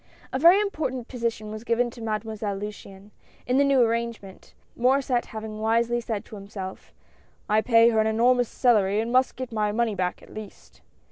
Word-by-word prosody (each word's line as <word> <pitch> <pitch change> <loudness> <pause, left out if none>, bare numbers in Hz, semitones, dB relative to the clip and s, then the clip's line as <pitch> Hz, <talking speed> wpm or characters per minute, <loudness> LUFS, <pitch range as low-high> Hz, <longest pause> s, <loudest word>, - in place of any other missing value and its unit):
A 260 - 0
very 340 +6 +7
important 290 - -2
position 230 -4 -3
was 215 +1 -7
given 240 +1 0
to 235 - -12
Made 215 -1 -2
moiselle 210 -2 -4
Luciane, 205 -1 -9 0.3
in 250 +2 +2
the - - +5
new 275 -2 +4
arrangement, 230 -4 -3 0.2
Mauressct 255 0 +1
having 220 -1 -7
wisely 230 +2 +1
said 220 -3 -4
to - - -16
himself: 195 -1 -8 0.3
" - - -35
I 215 +1 +3
pay 230 0 +5
her 220 -2 +1
an 220 - +3
enormous 245 +2 +2
salary, 210 -5 +2
and 230 +2 -2
must 255 +1 +2
get 255 -1 -6
my 210 -2 0
money 230 0 0
back, 180 -2 -3
at - - -15
least 215 -2 -11
230 Hz, 190 wpm, -25 LUFS, 215-245 Hz, 0.3 s, very